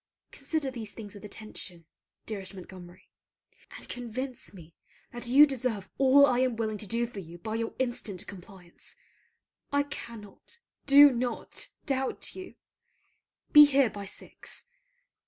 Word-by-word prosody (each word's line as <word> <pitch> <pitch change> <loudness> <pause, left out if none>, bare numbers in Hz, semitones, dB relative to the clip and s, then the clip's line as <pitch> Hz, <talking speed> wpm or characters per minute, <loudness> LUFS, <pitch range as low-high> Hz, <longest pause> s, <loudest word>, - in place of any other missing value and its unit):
Consider 305 -5 -3
these 225 -4 -6
things 205 -3 -8
with 205 - -12
attention, 200 -5 -7 0.4
dearest 195 -3 -6
Montgomery: 185 -1 -12 0.7
and - - -12
convince 245 +1 -5
me 170 -4 -14 0.4
that 240 0 -3
you 275 +5 +8
deserve 245 -8 -3
all 275 +1 +7
I 250 -3 +2
am 255 -2 +1
willing 215 -2 -2
to 210 - -5
do 235 +3 0
for 230 -4 -8
you 170 -2 -10
by 215 +6 -5
your 225 0 -3
instant 240 -7 -3
compliance. 185 -2 -11 0.8
I 285 0 +3
cannot, 235 - -9 0.3
do 285 +1 +9
not, 240 -1 -3 0.2
doubt 265 -2 -1
you. 375 -1 -9 1.0
Be 295 0 +11
here 275 -5 +3
by 200 -1 -7
six. 205 - -8
230 Hz, 140 wpm, -29 LUFS, 200-260 Hz, 1.0 s, Be